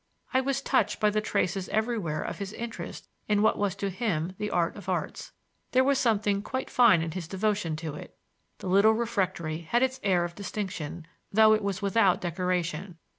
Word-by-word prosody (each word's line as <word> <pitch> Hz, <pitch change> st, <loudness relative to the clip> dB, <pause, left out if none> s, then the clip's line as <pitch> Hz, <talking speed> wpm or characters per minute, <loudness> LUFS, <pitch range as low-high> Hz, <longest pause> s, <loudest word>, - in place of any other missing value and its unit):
I 260 Hz, -, +4 dB
was 275 Hz, +1 st, -1 dB
touched 210 Hz, -5 st, +1 dB
by 210 Hz, -1 st, +3 dB
the 215 Hz, +1 st, +1 dB
traces 195 Hz, -3 st, -1 dB
everywhere 215 Hz, -8 st, -1 dB
of -, -, -5 dB
his 200 Hz, 0 st, -5 dB
interest 235 Hz, +1 st, -7 dB, 0.2 s
in 210 Hz, 0 st, +2 dB
what 220 Hz, -, +3 dB
was 200 Hz, -2 st, 0 dB
to 200 Hz, 0 st, -3 dB
him 185 Hz, -5 st, -1 dB
the 210 Hz, -, -2 dB
art 170 Hz, -4 st, 0 dB
of -, -, -8 dB
arts; -, -, -3 dB, 0.4 s
there 260 Hz, +1 st, +5 dB
was 275 Hz, 0 st, +2 dB
something 205 Hz, -4 st, +2 dB
quite 260 Hz, +5 st, -4 dB
fine 230 Hz, -9 st, +5 dB
in 165 Hz, -, -3 dB
his 170 Hz, -1 st, -5 dB
devotion 195 Hz, -3 st, -1 dB
to 155 Hz, -1 st, -5 dB
it. 150 Hz, -, -10 dB, 0.4 s
The -, -, -7 dB
little 200 Hz, +4 st, +5 dB
refectory 185 Hz, -8 st, -1 dB
had 235 Hz, +10 st, +1 dB
its 260 Hz, 0 st, 0 dB
air 180 Hz, -3 st, +2 dB
of 175 Hz, -, -6 dB
distinction, 185 Hz, -5 st, -5 dB, 0.3 s
though 215 Hz, +1 st, +6 dB
it 215 Hz, -, +2 dB
was 200 Hz, -1 st, -2 dB
without 200 Hz, -2 st, +3 dB
decoration. 175 Hz, 0 st, -2 dB
200 Hz, 190 wpm, -28 LUFS, 175-220 Hz, 0.4 s, though